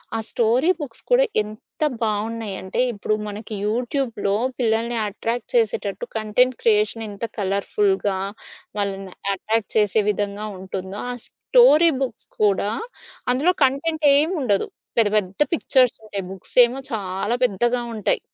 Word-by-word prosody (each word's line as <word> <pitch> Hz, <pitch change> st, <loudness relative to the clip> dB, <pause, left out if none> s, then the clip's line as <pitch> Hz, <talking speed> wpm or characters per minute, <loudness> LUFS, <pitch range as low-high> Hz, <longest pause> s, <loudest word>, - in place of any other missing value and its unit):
ఆ -, -, +1 dB
story 240 Hz, +7 st, +2 dB
books 250 Hz, -6 st, -6 dB
కూడా -, -, +6 dB, 0.2 s
ఎంత 215 Hz, +7 st, -13 dB, 0.2 s
బాగున్నాయంటే, 210 Hz, -3 st, -3 dB
ఇప్పుడు 215 Hz, 0 st, -1 dB
మనకి 210 Hz, +1 st, -7 dB
యూట్యూబ్‌లో 235 Hz, -3 st, -1 dB, 0.2 s
పిల్లల్ని 230 Hz, 0 st, +1 dB
అట్రాక్ట్ 230 Hz, -, -4 dB
చేసేటట్టు 470 Hz, +1 st, 0 dB
కంటెంట్ 235 Hz, +4 st, +2 dB
క్రియేషన్ 215 Hz, 0 st, +2 dB
ఎంత 205 Hz, +3 st, -5 dB
కలర్‌ఫుల్‌గా, 200 Hz, -, 0 dB, 0.6 s
వాళ్ళని 195 Hz, -2 st, -3 dB, 0.2 s
అట్రాక్ట్ 220 Hz, +3 st, -1 dB
చేసే 210 Hz, 0 st, +3 dB
విధంగా 205 Hz, +1 st, -3 dB
ఉంటుందో, 190 Hz, +1 st, -6 dB
ఆ -, -, -3 dB
స్టోరీ 340 Hz, -10 st, +5 dB
బుక్స్ 245 Hz, -4 st, -6 dB
కూడా, 205 Hz, -1 st, +3 dB, 0.6 s
అందులో 300 Hz, +9 st, +3 dB
కంటెంటేముండదు. 290 Hz, -, +2 dB, 0.3 s
పెద్ద, 225 Hz, -3 st, +5 dB
పెద్ద 195 Hz, +3 st, -2 dB
పిక్చర్సుంటాయి. 235 Hz, -9 st, +1 dB
బుక్స్ 190 Hz, -, -10 dB
ఏమో 245 Hz, +3 st, -5 dB
చాలా 200 Hz, +2 st, -1 dB
పెద్దగా 240 Hz, +2 st, +1 dB
ఉంటాయి. 215 Hz, -, +1 dB
220 Hz, 115 wpm, -22 LUFS, 205-255 Hz, 0.6 s, కూడా